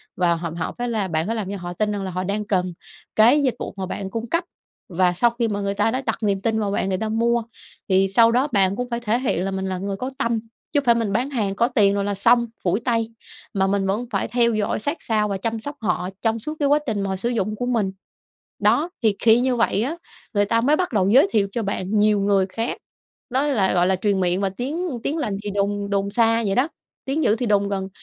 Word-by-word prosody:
và 175 Hz, -2 st, +2 dB
họ 165 Hz, 0 st, -4 dB
họ 165 Hz, -, -3 dB
phải 245 Hz, 0 st, -2 dB
là 215 Hz, -5 st, -1 dB
bạn 160 Hz, 0 st, -1 dB
phải 230 Hz, -, -1 dB
làm 200 Hz, -4 st, -3 dB
cho 200 Hz, -, -4 dB
họ 175 Hz, -1 st, -6 dB
tin 210 Hz, +3 st, 0 dB
rằng 205 Hz, -1 st, -3 dB
là 190 Hz, -, -4 dB
họ 185 Hz, +1 st, -2 dB
đang 205 Hz, +2 st, -2 dB
cần 180 Hz, -3 st, 0 dB, 0.4 s
cái 245 Hz, +7 st, +5 dB
dịch 255 Hz, -, +1 dB
vụ -, -, -5 dB
mà 190 Hz, -, -3 dB
bạn 190 Hz, +1 st, -5 dB
cung 230 Hz, +3 st, -4 dB
cấp. 335 Hz, +8 st, +1 dB, 0.5 s
Và 180 Hz, 0 st, +2 dB
sau 235 Hz, +7 st, +3 dB
khi 235 Hz, -, +2 dB
mà 205 Hz, -1 st, -2 dB
người 200 Hz, 0 st, -1 dB
ta 225 Hz, +2 st, +1 dB
đã 255 Hz, -, -1 dB
đặt 225 Hz, -, 0 dB
niềm 195 Hz, -2 st, +1 dB
tin 220 Hz, 0 st, 0 dB
vào 205 Hz, -2 st, -1 dB
bạn 195 Hz, -, 0 dB
người 185 Hz, -, 0 dB
ta 220 Hz, +1 st, -2 dB
mua, 235 Hz, +1 st, +1 dB, 0.5 s
thì 190 Hz, 0 st, +4 dB
sau 230 Hz, +4 st, +5 dB
đó 255 Hz, +5 st, +2 dB
bạn 195 Hz, -3 st, +3 dB
cũng 250 Hz, +2 st, -4 dB
phải 235 Hz, -1 st, -2 dB
thể 235 Hz, +1 st, 0 dB
hiện 190 Hz, -8 st, 0 dB
là 195 Hz, -, -2 dB
mình 190 Hz, 0 st, -3 dB
là 190 Hz, -1 st, -2 dB
người 195 Hz, +1 st, -3 dB
có 255 Hz, +4 st, -3 dB
tâm, 230 Hz, -1 st, 0 dB, 0.3 s
chứ 290 Hz, -, +4 dB
hông 275 Hz, -, -5 dB
phải 235 Hz, -1 st, +5 dB
mình 225 Hz, -4 st, -1 dB
bán 250 Hz, +6 st, 0 dB
hàng 205 Hz, -7 st, -1 dB
có 235 Hz, +3 st, +2 dB
tiền 210 Hz, -6 st, +3 dB
rồi 200 Hz, -, 0 dB
là 205 Hz, -, -1 dB
xong 235 Hz, +4 st, +4 dB, 0.2 s
phủi 185 Hz, +4 st, +1 dB
tay, 230 Hz, -2 st, -1 dB, 0.4 s
mà 195 Hz, -1 st, +1 dB
mình 195 Hz, 0 st, 0 dB
vẫn 215 Hz, +6 st, -1 dB
phải -, -, 0 dB
theo 235 Hz, -1 st, +2 dB
dõi 215 Hz, -1 st, -1 dB
sát 285 Hz, +9 st, -2 dB
sao 215 Hz, -2 st, 0 dB
và 200 Hz, -1 st, -2 dB
chăm 225 Hz, +3 st, -2 dB
sóc 285 Hz, +5 st, -7 dB
họ 180 Hz, -2 st, -1 dB
trong 225 Hz, 0 st, +1 dB
suốt 305 Hz, +8 st, -5 dB
cái 285 Hz, -, +2 dB
quá 295 Hz, +1 st, +4 dB
trình 210 Hz, -3 st, -1 dB
mà 195 Hz, -, -2 dB
họ 190 Hz, -, -1 dB
sử 215 Hz, +6 st, -2 dB
dụng 215 Hz, -3 st, -1 dB
của 245 Hz, -, -3 dB
mình. 225 Hz, -6 st, 0 dB, 0.7 s
Đó, 325 Hz, +4 st, +2 dB
thì 215 Hz, -3 st, +2 dB
khi 230 Hz, +1 st, +5 dB
như 255 Hz, -1 st, +1 dB
vậy 220 Hz, -2 st, +1 dB
á 305 Hz, +7 st, -2 dB, 0.4 s
người 205 Hz, 0 st, +3 dB
ta 230 Hz, +3 st, +1 dB
mới 290 Hz, +6 st, +3 dB
bắt 360 Hz, -5 st, -1 dB
đầu 195 Hz, -3 st, +2 dB
giới 265 Hz, -, +6 dB
thiệu 200 Hz, -3 st, +2 dB
cho 235 Hz, -, -2 dB
bạn 200 Hz, +1 st, -1 dB
nhiều 210 Hz, -1 st, +3 dB
người 195 Hz, -1 st, +2 dB
khác. 230 Hz, +4 st, -3 dB, 0.5 s
Đó 265 Hz, +4 st, +1 dB
là, 200 Hz, -9 st, +2 dB
gọi 175 Hz, 0 st, +3 dB
là, 190 Hz, 0 st, +2 dB
truyền 195 Hz, 0 st, 0 dB
miệng 180 Hz, +1 st, +1 dB
và 195 Hz, -, +1 dB
tiếng 285 Hz, -, -3 dB
tiếng 305 Hz, -, -1 dB
lành 210 Hz, -10 st, -2 dB
thì 205 Hz, -, -3 dB
đồn 200 Hz, 0 st, -1 dB
đồn 200 Hz, 0 st, 0 dB
xa 230 Hz, +1 st, +3 dB
vậy 195 Hz, -, +1 dB
đó, 265 Hz, +6 st, +2 dB, 0.4 s
tiếng 290 Hz, +4 st, -1 dB
dữ 215 Hz, -, +3 dB
thì 245 Hz, -, -2 dB
đồn 200 Hz, -1 st, +2 dB
gần. 195 Hz, -1 st, -3 dB
210 Hz, 270 wpm, -22 LUFS, 195-235 Hz, 0.7 s, giới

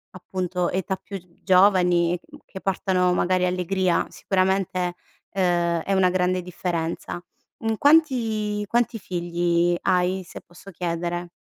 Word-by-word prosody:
appunto, 180 Hz, -1 st, -2 dB
età 190 Hz, +1 st, -1 dB
più 195 Hz, 0 st, -8 dB, 0.2 s
giovani, 180 Hz, -2 st, +4 dB
mhmm, -, -, -16 dB
che 190 Hz, -, -10 dB
portano 185 Hz, -2 st, +1 dB
magari 180 Hz, 0 st, +2 dB
allegria 180 Hz, 0 st, 0 dB
sicuramente, 185 Hz, -2 st, 0 dB, 0.3 s
ehm, 175 Hz, -3 st, +1 dB
è 195 Hz, -, -1 dB
una 190 Hz, -1 st, +4 dB
grande 180 Hz, 0 st, +1 dB
differenza. 175 Hz, -1 st, -4 dB, 0.4 s
Mhmm, 225 Hz, 0 st, -1 dB
quanti 225 Hz, -9 st, +2 dB
quanti 235 Hz, +1 st, 0 dB
figli 175 Hz, -1 st, 0 dB
hai, 185 Hz, +1 st, +1 dB
se -, -, -10 dB
posso 175 Hz, +3 st, -14 dB
chiedere? 175 Hz, 0 st, -3 dB
180 Hz, 120 wpm, -24 LUFS, 175-195 Hz, 0.4 s, giovani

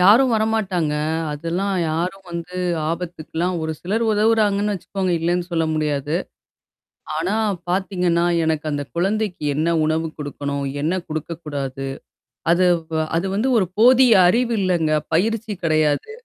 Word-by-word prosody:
யாரும் 230 Hz, +7 st, +6 dB
வரமாட்டாங்க. 200 Hz, -8 st, 0 dB, 0.4 s
அதெல்லாம் 170 Hz, +6 st, -2 dB, 0.2 s
யாரும் 180 Hz, +5 st, -2 dB
வந்து 170 Hz, +1 st, -6 dB, 0.3 s
ஆபத்துக்கலாம் 170 Hz, +1 st, -3 dB
ஒரு 160 Hz, 0 st, -2 dB
சிலர் 215 Hz, +6 st, -1 dB
உதவுறாங்கன்னு 210 Hz, -1 st, +2 dB
வச்சுக்கோங்க 190 Hz, 0 st, -2 dB
இல்லேன்னு 175 Hz, +2 st, -1 dB
சொல்ல 165 Hz, -1 st, +1 dB
முடியாது. 150 Hz, -1 st, -1 dB, 1.0 s
ஆனா 180 Hz, +7 st, 0 dB, 0.3 s
பாத்தீங்கன்னா, 180 Hz, -2 st, +1 dB, 0.2 s
எனக்கு 160 Hz, -1 st, -1 dB
அந்த 145 Hz, -1 st, -2 dB
குழந்தைக்கு 195 Hz, 0 st, -1 dB
என்ன 165 Hz, +3 st, +1 dB
உணவு 160 Hz, +1 st, 0 dB
குடுக்கணும்? 140 Hz, -1 st, -3 dB, 0.2 s
என்ன 180 Hz, +4 st, 0 dB
குடுக்கக்கூடாது? 145 Hz, -4 st, -5 dB, 0.6 s
அது, 180 Hz, +1 st, +4 dB, 0.2 s
ப 160 Hz, 0 st, +1 dB, 0.2 s
அது 170 Hz, -, -1 dB
வந்து 235 Hz, +6 st, +1 dB
ஒரு 190 Hz, -, +1 dB
போதிய 250 Hz, +1 st, +7 dB
அறிவு 235 Hz, +5 st, +2 dB
இல்லங்க. 175 Hz, -4 st, +1 dB, 0.2 s
பயிற்சி 220 Hz, +4 st, 0 dB
கிடையாது. 155 Hz, -, +1 dB
175 Hz, 120 wpm, -21 LUFS, 160-200 Hz, 1.0 s, போதிய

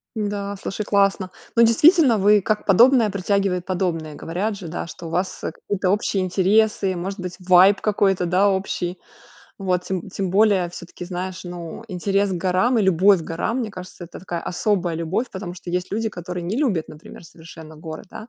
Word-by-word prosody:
Да, 205 Hz, -2 st, -3 dB
слушай, 200 Hz, +2 st, -5 dB
классно. 200 Hz, -2 st, +1 dB, 0.3 s
Ну, 235 Hz, -, +7 dB
действительно, 265 Hz, -, +5 dB
вы, 205 Hz, +1 st, +5 dB
как 215 Hz, +1 st, -1 dB
подобное 230 Hz, +3 st, +5 dB
притягивает 195 Hz, -2 st, -1 dB
подобное. 170 Hz, -5 st, -2 dB
Говорят 195 Hz, +8 st, -3 dB
же, 180 Hz, -5 st, -8 dB
да, 170 Hz, -, -5 dB
что 170 Hz, -, -9 dB
у -, -, -6 dB
вас, 180 Hz, +3 st, -3 dB
э, -, -, -2 dB
какие-то 190 Hz, +2 st, -3 dB
общие 200 Hz, -1 st, 0 dB
интересы, 195 Hz, +1 st, +2 dB
может 190 Hz, +3 st, -5 dB
быть 180 Hz, -1 st, -5 dB
vibe 185 Hz, +2 st, +5 dB
какой-то, 195 Hz, -3 st, +1 dB
да, 185 Hz, +4 st, +3 dB
общий 190 Hz, -2 st, -2 dB, 0.6 s
вот. 185 Hz, -2 st, 0 dB
Тем 190 Hz, 0 st, -4 dB
тем 190 Hz, -1 st, -3 dB
более, 195 Hz, -3 st, +3 dB
всё-таки, 175 Hz, 0 st, -9 dB
знаешь, 185 Hz, +1 st, -5 dB
ну, 175 Hz, +2 st, -7 dB
интерес 195 Hz, +2 st, 0 dB
к -, -, -1 dB
горам 185 Hz, +8 st, +1 dB
и -, -, +2 dB
любовь 190 Hz, +1 st, +4 dB
к -, -, -7 dB
горам, 220 Hz, +9 st, -2 dB
мне 230 Hz, -4 st, -3 dB
кажется, 185 Hz, -2 st, -10 dB
это 170 Hz, -, -11 dB
такая 175 Hz, -2 st, -5 dB
особая 180 Hz, -2 st, -1 dB
любовь. 170 Hz, +9 st, -2 dB
Потому 190 Hz, -2 st, -6 dB
что 180 Hz, -, -12 dB
есть 180 Hz, +1 st, -2 dB
люди, 220 Hz, +2 st, -1 dB
которые 180 Hz, -2 st, -6 dB
не 190 Hz, +6 st, -2 dB
любят, 225 Hz, -, 0 dB
например, 155 Hz, +2 st, -12 dB
совершенно 160 Hz, -1 st, -13 dB
горы, 155 Hz, +1 st, -8 dB
да. 215 Hz, +4 st, -10 dB
190 Hz, 185 wpm, -22 LUFS, 175-205 Hz, 0.6 s, Ну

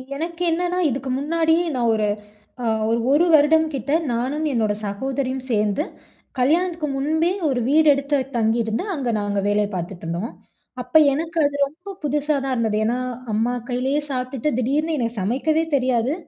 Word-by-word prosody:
எனக்கு 335 Hz, +3 st, -5 dB
என்னன்னா, 355 Hz, +2 st, 0 dB
இதுக்கு 265 Hz, +1 st, -3 dB
முன்னாடியே 325 Hz, +3 st, +2 dB
நான் 235 Hz, -2 st, +2 dB
ஒரு 215 Hz, -1 st, +1 dB, 0.6 s
அ -, -, -1 dB, 0.2 s
ஒரு, 230 Hz, -, +2 dB
1 300 Hz, +5 st, +4 dB
வருடம் 315 Hz, +1 st, +5 dB
கிட்ட 270 Hz, +2 st, -3 dB, 0.2 s
நானும் 265 Hz, +7 st, -1 dB
என்னோட 220 Hz, -3 st, +1 dB
சகோதரியும் 260 Hz, +5 st, -3 dB
சேர்ந்து 210 Hz, +4 st, +1 dB, 0.6 s
கல்யாணத்துக்கு 330 Hz, +4 st, +1 dB
முன்பே 315 Hz, +5 st, +1 dB, 0.2 s
1 260 Hz, -3 st, 0 dB
வீடு 310 Hz, +2 st, +4 dB
எடுத்து 280 Hz, +1 st, 0 dB, 0.2 s
தங்கியிருந்து, 225 Hz, +2 st, +1 dB
அங்க 265 Hz, -5 st, -2 dB
நாங்க 205 Hz, 0 st, -1 dB
வேலை 205 Hz, 0 st, +2 dB
பார்த்துட்டுருந்தோம். 175 Hz, +3 st, -4 dB, 0.5 s
அப்ப 250 Hz, -, -12 dB, 0.2 s
எனக்கு 325 Hz, +3 st, -3 dB
அது 285 Hz, 0 st, 0 dB
ரொம்ப 330 Hz, +8 st, -11 dB
புதுசா 295 Hz, +1 st, 0 dB
தான் 270 Hz, -, -1 dB
இருந்தது. 220 Hz, -3 st, 0 dB
ஏன்னா, 240 Hz, +3 st, 0 dB, 0.3 s
அம்மா 225 Hz, +3 st, +1 dB, 0.2 s
கையிலேயே 260 Hz, +4 st, 0 dB
சாப்பிட்டுட்டு 255 Hz, +1 st, -2 dB
திடீர்னு 300 Hz, +6 st, 0 dB
எனக்கு 230 Hz, -3 st, -2 dB
சமைக்கவே 275 Hz, +10 st, +1 dB
தெரியாது. 255 Hz, -1 st, +1 dB
270 Hz, 145 wpm, -22 LUFS, 230-310 Hz, 0.6 s, வருடம்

